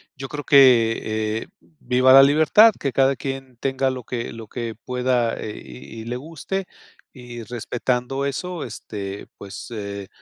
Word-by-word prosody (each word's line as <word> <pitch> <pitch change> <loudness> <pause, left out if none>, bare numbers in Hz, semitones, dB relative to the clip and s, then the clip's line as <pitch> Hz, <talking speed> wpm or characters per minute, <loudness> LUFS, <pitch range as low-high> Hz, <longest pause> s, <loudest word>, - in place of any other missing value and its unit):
yo 135 -1 -7
creo 145 -1 -6
que, 115 -5 +4
eh, - - -17
viva 130 -4 +2
la 135 0 +10
libertad, 155 +10 +6
que 140 -3 -2
cada 135 0 +3
quien 135 -1 -6
tenga 135 +1 0
lo 130 -1 -5
que 120 -2 -4
lo 115 -2 -9
que 115 -1 -5
pueda, 125 0 0
eh, 105 - -6
y 65 - -10
y 110 - -9
le 120 - -4
guste 165 +7 -5 0.5
y, 120 -3 -9
respetando 125 +3 -2
eso, 170 +4 -4
este, 100 -3 -7
pues, 100 -1 -9
eh, 100 -3 -6
125 Hz, 160 wpm, -22 LUFS, 115-135 Hz, 0.5 s, la